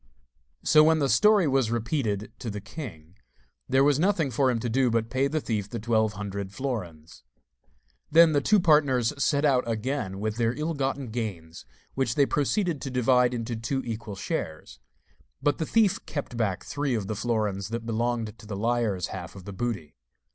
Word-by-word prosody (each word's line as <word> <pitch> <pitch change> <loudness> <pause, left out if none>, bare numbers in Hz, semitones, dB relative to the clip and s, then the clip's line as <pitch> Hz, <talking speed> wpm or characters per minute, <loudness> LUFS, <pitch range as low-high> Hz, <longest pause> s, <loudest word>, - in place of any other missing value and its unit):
So, 155 0 +6
when 160 0 +4
the 145 -3 +1
story 190 - +4
was 135 -4 +2
repeated 115 -3 -2
to 120 - -5
the 105 0 -4
king, 95 - -9 0.5
there 135 +1 +4
was 145 0 +3
nothing 170 -6 +1
for 130 +2 +2
him 120 -2 0
to 120 - -2
do 125 +2 +2
but 115 0 +2
to 110 - -12
pay 135 +2 +2
the 155 +3 -1
thief 105 -7 -3
the 120 - -4
twelve 110 -1 +1
hundred 100 -1 -5
florins. 90 - -5 0.9
Then 165 +1 +7
the 145 -2 +2
two 210 +8 +4
partners 145 -8 +3
set 145 0 +2
out 130 -3 +3
again 110 -4 -2
with 110 +1 -2
their 115 -1 +1
ill 155 +4 -2
gotten 135 -3 -2
gains, 90 - -5 0.3
which 130 -3 -1
they 140 - +4
proceeded 155 +3 0
to 135 - -4
divide 125 0 +3
into 115 0 -3
two 130 +4 -2
equal 110 -3 -5
shares; 80 -8 -5 0.6
but 145 +1 0
the 160 - -2
thief 220 -4 +2
kept 145 -5 -5
back 105 -5 -1
three 140 -3 -1
of 105 -3 -2
the 110 +2 -3
florins 105 -4 -1
that 115 0 -4
belonged 115 -1 -2
to 105 - -13
the 100 -2 -5
liar's 110 -4 0
half 90 -1 -7
of 95 -2 -11
the 100 - -7
booty. 100 - -4
120 Hz, 190 wpm, -27 LUFS, 105-140 Hz, 0.9 s, Then